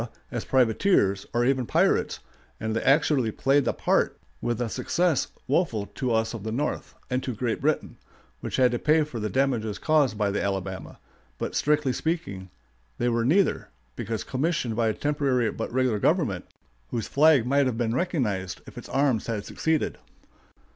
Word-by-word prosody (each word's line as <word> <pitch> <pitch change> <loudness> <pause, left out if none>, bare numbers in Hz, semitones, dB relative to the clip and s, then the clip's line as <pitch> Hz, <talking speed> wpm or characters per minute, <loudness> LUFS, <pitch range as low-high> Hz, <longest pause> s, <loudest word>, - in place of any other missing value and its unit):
as 120 - -3
privateers, 115 - +2
or 120 +1 +1
even 130 0 +2
pirates, - - +1 0.4
and 110 0 -2
they 115 - 0
actually 140 -4 +3
played 135 +5 +2
the - - +2
part - - +1 0.2
with 120 -1 -1
a 120 - 0
success 155 +7 0 0.2
woeful 130 - +1
to 130 +3 -3
us 110 0 +1
of 115 - -6
the 110 +2 -4
North, 145 +7 -3 0.2
and 125 +1 +1
to 125 -3 -4
Great 115 0 -2
Britain, 150 +2 -1 0.4
which - - -4
had 125 -1 +4
to 120 - -1
pay 155 +1 +3
for 145 -6 -6
the 105 0 -2
damages 120 -6 0
caused 150 -8 +2
by 105 -2 +1
the 105 - -1
Alabama; 95 -2 -4 0.4
but, - - -4
strictly 150 -3 +2
speaking, 110 - -3 0.5
they 120 - +1
were 115 -1 +1
neither, 180 +11 +2 0.3
because 110 -1 -3
commissioned 135 -4 -1
by 115 0 +1
a 110 - +1
temporary 140 -5 +1
but 115 - -5
regular 125 -4 +1
government, 130 - +1 0.4
whose 115 -3 -3
flag 145 -4 +5
might 140 +2 +3
have 120 -3 -2
been 115 -2 0
recognized 105 - -1
if - - -9
its - - -12
arms 135 -4 +1
had 110 -3 -3
succeeded. 160 -1 -1
125 Hz, 175 wpm, -26 LUFS, 110-145 Hz, 0.5 s, flag